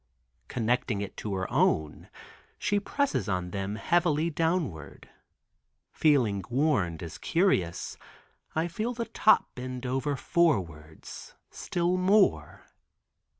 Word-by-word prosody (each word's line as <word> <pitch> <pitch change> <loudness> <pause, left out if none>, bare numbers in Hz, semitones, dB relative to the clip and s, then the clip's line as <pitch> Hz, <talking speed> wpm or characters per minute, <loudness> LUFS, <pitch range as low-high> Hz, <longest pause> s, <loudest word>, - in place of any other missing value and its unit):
Connecting 120 -2 -1
it 100 - -6
to 105 -2 -3
her 95 0 -2
own, 75 -1 +1 0.5
she 205 0 +1
presses 200 - -1
on 90 -2 -2
them 100 +1 -3
heavily 170 +5 +1
downward. 150 - -2 0.8
Feeling 120 -11 +2
warned, 120 - +1
as 80 -1 -8
curious, 130 - 0 0.6
I 160 +2 +1
feel 220 +8 -3
the 235 0 -3
top 215 - +3
bend 125 0 -6
over 135 +3 -1
forwards, 85 - -1 0.2
still 175 +1 -1
more. 195 +2 +2
130 Hz, 110 wpm, -28 LUFS, -, 0.8 s, top